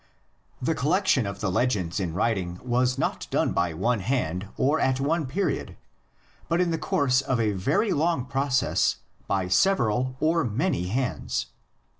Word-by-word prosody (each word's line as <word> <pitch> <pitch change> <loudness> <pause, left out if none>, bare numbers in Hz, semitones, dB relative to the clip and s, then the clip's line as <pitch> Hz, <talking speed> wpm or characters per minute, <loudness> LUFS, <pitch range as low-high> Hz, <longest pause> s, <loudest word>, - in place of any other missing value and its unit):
The 145 +6 0
collection 155 - +2
of 100 0 -6
the 95 - 0
legends 95 -6 0
in 85 -4 -3
writing 90 -4 -1
was 125 +1 +1
not 135 - -2
done - - +1
by 85 -2 0
one 115 +7 +1
hand 95 -5 -1
or 145 +4 +2
at 130 0 +1
one 150 +2 0
period, 175 +3 -2 0.7
but 170 - +2
in 180 -2 +2
the 165 - -1
course 130 -2 +2
of 130 -3 -1
a 110 -2 +2
very 135 - +1
long 155 -3 +1
process 135 -1 +1 0.3
by 95 -2 0
several 125 - +2
or 165 +1 +2
many 115 - -1
hands. 125 +6 -2
125 Hz, 155 wpm, -26 LUFS, 100-150 Hz, 0.7 s, collection